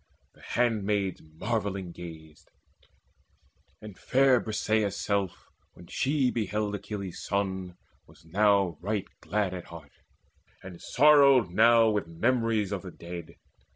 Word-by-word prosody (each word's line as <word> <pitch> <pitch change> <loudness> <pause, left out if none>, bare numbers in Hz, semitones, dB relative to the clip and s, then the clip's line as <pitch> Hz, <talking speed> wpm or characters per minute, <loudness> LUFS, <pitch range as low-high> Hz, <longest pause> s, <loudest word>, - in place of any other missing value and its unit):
The - - -22
handmaids 105 -5 0
marvelling 95 +3 -4
gazed; 80 -3 -11 1.3
And 105 -3 -10
fair 130 -1 +3
Briseis' 110 -2 0
self, 100 -3 -2 0.2
when 85 - -14
she 135 - 0
beheld 105 -2 -2
Achilles' 100 -3 -6
son, 95 -2 -3 0.3
was - - -20
now 100 -2 +2
right 100 +1 -2
glad 100 -3 -1
at 90 -2 -7
heart, 80 -4 -12 0.7
And 90 -2 -10
sorrowed 140 -6 +5
now 115 +3 +5
with 105 -4 -1
memories 115 +3 0
of 100 - -3
the 95 - -8
dead. 85 -1 -9
100 Hz, 120 wpm, -28 LUFS, 90-110 Hz, 1.3 s, sorrowed